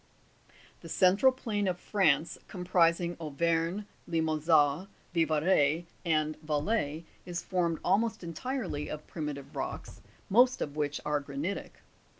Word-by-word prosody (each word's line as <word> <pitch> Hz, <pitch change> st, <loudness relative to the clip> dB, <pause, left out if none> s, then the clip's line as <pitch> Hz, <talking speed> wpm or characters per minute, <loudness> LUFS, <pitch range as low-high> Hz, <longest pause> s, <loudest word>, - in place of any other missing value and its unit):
22. -, -, -26 dB, 0.2 s
The -, -, -10 dB
central 195 Hz, +8 st, +5 dB
plane 215 Hz, -6 st, -2 dB
of 180 Hz, -1 st, -1 dB
France, 170 Hz, -6 st, +1 dB
comprising 175 Hz, -1 st, +2 dB
Auvergne, 165 Hz, +5 st, 0 dB, 0.2 s
Limou 160 Hz, -2 st, 0 dB
sin, 155 Hz, +2 st, +3 dB, 0.3 s
Vivarais, 160 Hz, -1 st, +2 dB, 0.2 s
and 155 Hz, -2 st, 0 dB
Valais, 155 Hz, +1 st, -1 dB, 0.2 s
is 175 Hz, -1 st, -4 dB
formed 170 Hz, -3 st, 0 dB
almost 215 Hz, +2 st, +1 dB
entirely 175 Hz, -, -3 dB
of 155 Hz, 0 st, -6 dB
primitive 150 Hz, -3 st, -6 dB
rocks, -, -, -5 dB, 0.3 s
most 250 Hz, +5 st, +5 dB
of 145 Hz, -, -4 dB
which 145 Hz, -1 st, -1 dB
are 150 Hz, 0 st, +1 dB
granitic. 145 Hz, +7 st, -5 dB
165 Hz, 125 wpm, -30 LUFS, 150-190 Hz, 0.3 s, central